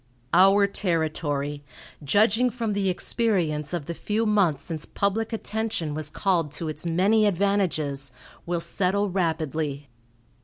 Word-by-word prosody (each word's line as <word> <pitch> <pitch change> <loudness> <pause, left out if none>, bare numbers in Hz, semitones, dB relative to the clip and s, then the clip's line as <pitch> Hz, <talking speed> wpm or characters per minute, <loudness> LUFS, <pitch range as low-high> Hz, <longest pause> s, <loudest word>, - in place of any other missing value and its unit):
"Our 195 +2 +6
territory, 155 -6 -2 0.4
judging 215 - +3
from 230 -2 -2
the 200 -1 0
experience 175 -7 0
of 170 -5 -3
the 170 - -4
few 215 +6 -1
months 195 -9 +2
since 160 -2 -5
public 210 +3 -1
attention 220 -8 -2
was 155 0 -3
called 170 -6 0
to 160 +2 -4
its 155 +2 -5
many 200 +6 +3
advantages, 170 -8 0 0.4
will 170 -1 -1
settle 200 +3 0
rapidly. 155 -5 -2
180 Hz, 125 wpm, -25 LUFS, 155-205 Hz, 0.4 s, Our